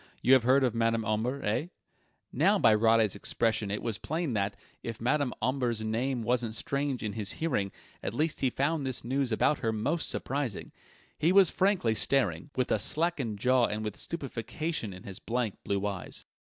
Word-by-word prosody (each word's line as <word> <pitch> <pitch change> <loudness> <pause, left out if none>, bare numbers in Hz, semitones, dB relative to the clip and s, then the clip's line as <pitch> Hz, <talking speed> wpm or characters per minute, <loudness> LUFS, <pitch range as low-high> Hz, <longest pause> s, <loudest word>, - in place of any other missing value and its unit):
You 130 - +6
have 130 - +7
heard 130 +4 +4
of 125 -3 +2
Madame 115 -1 +1
Omber, 115 +6 -1
eh?" 110 +10 0 0.7
Now 190 - +4
by 115 - +5
Roddy's 110 -1 +4
expression 110 0 0
it 105 - -3
was 115 -3 -2
plain 160 -3 -2
that, 100 -1 -1 0.3
if 115 -1 -6
Madame 130 +2 +1
Omber's 125 -3 0
name 120 +3 -1
wasn't 120 -2 0
strange 140 -1 -2
in 105 -1 -2
his 105 -2 -2
hearing, 125 -12 -1 0.3
at 110 - -4
least 155 +4 0
he 130 - +2
found 145 +4 0
this 130 -2 -3
news 130 +1 -1
about 135 +6 +2
her 115 - 0
most 130 +10 -1
surprising. 135 -6 -3 0.5
He 160 +4 +3
was 190 -3 +6
frankly 190 - +2
staring, 140 +5 +1
with 130 -1 0
a 110 - +3
slackened 145 -5 0
jaw 125 +3 +3
and 105 +1 -3
with 105 - -4
stupefaction 140 -3 -4
in 90 0 -10
his 95 -2 -8
blank 115 -3 -2
blue 100 0 -1
eyes. 100 -3 -5
120 Hz, 180 wpm, -29 LUFS, 110-140 Hz, 0.7 s, have